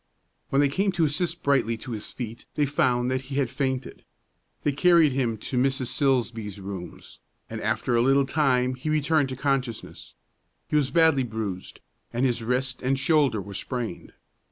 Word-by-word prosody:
When 135 - +3
they 145 - +4
came 195 +8 0
to 170 -3 +2
assist 165 +3 -1
Brightly 130 -5 +2
to 125 +3 -8
his 110 -2 -4
feet 115 -2 -7
they 150 - +2
found 125 -3 +1
that 130 0 0
he 135 +1 -7
had 135 -4 0
fainted. 130 -2 -3 0.6
They 145 - +2
carried 165 +1 +5
him 125 -4 0
to 125 +4 -2
Mrs. 135 -1 +1
Silsbee's 115 -7 0
rooms, 95 -2 -8 0.3
and - - -5
after 120 - 0
a 115 - +4
little 135 +2 +4
time 130 -3 +2
he 130 +4 -5
returned 155 -1 +2
to 130 - -4
consciousness. 135 -4 -3 0.5
He - - -2
was 145 -3 +3
badly 160 -5 +4
bruised, 110 -6 -5 0.3
and 120 +3 0
his 120 -2 0
wrist 125 +3 -1
and 135 +1 +1
shoulder 140 -5 +2
were 100 +1 -8
sprained. 120 -1 -5
130 Hz, 175 wpm, -26 LUFS, 120-145 Hz, 0.6 s, carried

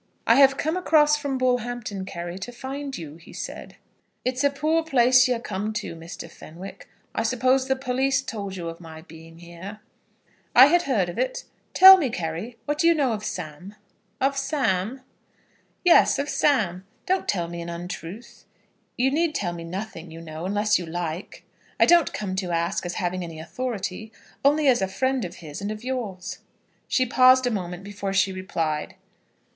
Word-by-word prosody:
"I - - +6
have 275 0 +6
come 315 +4 -1
across 305 -5 +4
from 285 -3 -2
Bullhampton, 245 -5 -1
Carry, 175 0 -6
to 230 +6 -6
find 270 +2 -6
you," 155 -2 -9
he 165 - -15
said. - - -7 0.5
"It's 255 +2 0
a 285 - +5
poor 310 +4 0
place 255 -4 +5
you're 250 -1 +1
come 210 -1 -4
to, 210 -5 -4
Mr. 165 +1 -9
Fenwick. 175 +5 -11 0.2
I - - -1
suppose 260 +1 +2
the 265 - +2
police 265 +1 0
told 200 -6 -5
you 175 -3 -5
of 165 0 -7
my 160 -2 -11
being 165 0 -14
here?" 175 +5 -10 0.8
"I 255 - +11
had 345 +5 +4
heard 225 - +1
of 175 - -6
it. - - -1 0.3
Tell 380 +1 +11
me, 295 -8 0
Carry, 180 +5 -5
what 295 0 -2
do 335 - +4
you 335 - +5
know 275 -6 +1
of 215 -1 -5
Sam?" 180 +1 -6 0.4
"Of 275 +1 +1
Sam?" 265 -5 -1 0.8
"Yes 350 - +6
of 285 +1 -2
Sam. 200 - +1 0.2
Don't 375 0 0
tell 175 -4 0
me 170 0 -6
an 170 - -6
untruth. 175 +5 -8 0.5
You 260 +2 +2
need 315 +1 +1
tell 175 - -1
me 170 -1 -7
nothing, 175 -1 -6
you 165 +1 -10
know, 160 +1 -6
unless 205 +1 +2
you 175 - -6
like. 170 +1 -5 0.4
I - - +7
don't 345 -3 +5
come 195 -3 -4
to 185 -2 -2
ask 170 +2 -1
as 175 - -5
having 185 -1 -2
any 165 -2 -8
authority, 220 +1 -5 0.3
only 290 +1 +3
as 250 -5 +4
a 190 - +1
friend 260 +5 -1
of 175 0 -8
his, 150 +3 -7
and 205 +1 -3
of 215 +1 -7
yours." 235 -8 -4 0.5
She 255 - +2
paused 255 +1 +5
a 245 - +1
moment 180 -3 -4
before 200 -1 -5
she 190 0 +2
replied. 165 -5 -3
215 Hz, 185 wpm, -24 LUFS, 175-265 Hz, 0.8 s, I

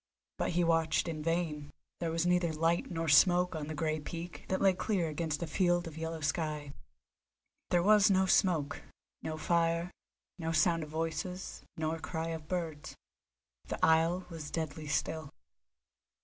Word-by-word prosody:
But - - 0
he 175 +1 +2
watched 165 0 +2
in 160 -2 -3
vain; 155 -3 -1 0.3
there 170 - -1
was 165 +1 0
neither 175 -1 +2
light 165 +2 +1
nor 165 -1 -2
smoke 180 +3 +5
on 150 -2 -4
the 155 - -4
grey 155 0 -1
peak 170 +3 -7
that 190 - 0
lay 195 -1 +5
clear 180 -2 0
against 155 0 -2
a - - -1
field 175 +2 +1
of 160 - -8
yellow 160 0 -4
sky. 150 -2 -2 1.0
There 175 -1 +3
was 210 +1 +6
no 190 -1 +4
smoke, 165 -6 +2 0.4
no 155 0 -4
fire, 170 +1 +1 0.5
no 165 -1 -2
sound 165 -1 +3
of 155 - -6
voices, 165 +4 -4 0.2
nor 160 +1 -1
cry 160 0 -3
of 160 -2 -5
birds. 160 -4 -4 0.7
The - - -3
isle 165 +3 +3
was 160 -3 -6
deadly 155 -1 -4
still. 155 0 -1
165 Hz, 160 wpm, -32 LUFS, 155-175 Hz, 1.0 s, was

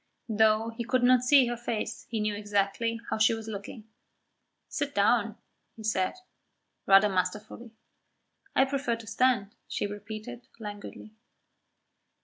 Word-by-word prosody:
Though 220 +1 +3
he 230 +1 -5
could 255 +1 +1
not 250 0 +6
see 260 +1 +6
her 240 0 -2
face, 230 -2 -4
he 225 - -2
knew 210 0 0
exactly 205 +3 -1
how - - 0
she 225 +1 +4
was 225 0 -8
looking. 215 +1 -7 0.8
"Sit 285 -1 -3
down," 215 +1 +2 0.4
he 220 - -11
said, 190 -4 0 0.7
rather 195 +1 +7
masterfully. 210 +5 -3 0.9
"I 265 - +5
prefer 270 -3 -1
to 230 0 -11
stand," 225 -2 +1
she - - -2
repeated 215 +4 -7
languidly. 210 0 -9
220 Hz, 130 wpm, -28 LUFS, 205-240 Hz, 0.9 s, rather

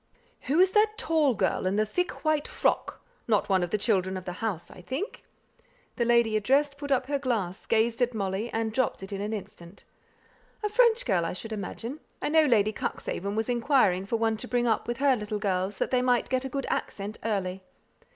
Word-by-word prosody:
"Who 300 +5 +3
is 375 +1 +5
that 425 +1 +3
tall 310 -6 +2
girl 190 -1 0
in 190 - 0
the 215 +1 +2
thick 360 +10 -3
white 310 -1 +2
frock? - - -1 0.2
Not 210 -3 +2
one 190 -1 +3
of 175 - -1
the 215 - +1
children 190 -3 +1
of 185 - -8
the 180 - -3
house, 205 -7 -3
I - - -12
think?" 265 - -5 0.7
The 240 - +1
lady 235 -2 +3
addressed 275 +7 +2
put 285 -1 -5
up 260 -2 +2
her 285 +1 -1
glass, 215 -9 -2
gazed 230 +1 +2
at 245 -1 +1
Molly, 200 +2 -2
and 225 -1 -1
dropped 255 -5 0
it 195 +1 -7
in 200 - -3
an 210 +1 -3
instant. 190 -3 -8 0.8
"A 420 - +1
French 470 +1 +4
girl, 190 -7 +2
I 165 - -2
should 225 +4 -6
imagine. 225 +7 -5 0.2
I - - -2
know 315 0 +5
Lady 215 -5 +3
Cuxhaven 200 -1 -3
was 220 0 -1
inquiring 235 -7 +2
for 230 - 0
one 225 -1 +1
to 250 - -5
bring 245 -1 +1
up 225 -2 +1
with 240 0 -2
her 275 -1 +4
little 210 -2 -3
girls, 195 -1 -1
that - - -1
they 250 -1 +3
might 250 -1 +2
get 260 0 0
a - - -3
good 275 +1 -3
accent 205 +2 -4
early. 195 -4 -2
225 Hz, 215 wpm, -27 LUFS, 200-265 Hz, 0.8 s, is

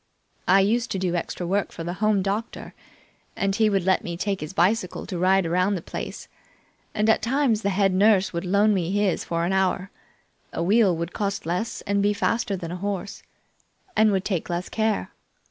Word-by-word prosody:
I 195 +2 +6
used 230 +4 +1
to - - -1
do 185 -2 -1
extra 175 +1 -3
work 195 +3 0
for 165 - -7
the 175 +1 -3
Home 210 -3 +3
doctor, 205 +4 -4 0.6
and 195 0 0
he 220 -1 +3
would 195 -3 +1
let 190 +1 +2
me 170 -1 -5
take 195 +1 -2
his 150 - -5
bicycle 190 +2 0
to 180 - -5
ride 190 +1 +3
around 180 +4 +1
the 180 - -4
place. - - -6 0.7
And 210 0 +1
at 220 - +4
times 245 -2 +1
the 200 - 0
head 195 0 +2
nurse 195 0 +3
would 170 - -2
loan 200 +3 +3
me 180 -4 -1
his 200 -1 +1
for 170 0 -1
an 185 - 0
hour. 190 0 0 0.6
A - - -2
wheel 195 -2 +3
would 170 +1 -4
cost 200 -3 -2
less 180 +7 -2
and 200 0 0
be 205 +1 +2
faster 210 -1 0
than 170 -2 -6
a 180 - -4
horse, 200 +1 -4 0.7
and 215 -1 +4
would 190 -1 0
take 185 -5 -2
less 175 +1 -3
care. 220 -1 -1
195 Hz, 200 wpm, -24 LUFS, 180-210 Hz, 0.7 s, I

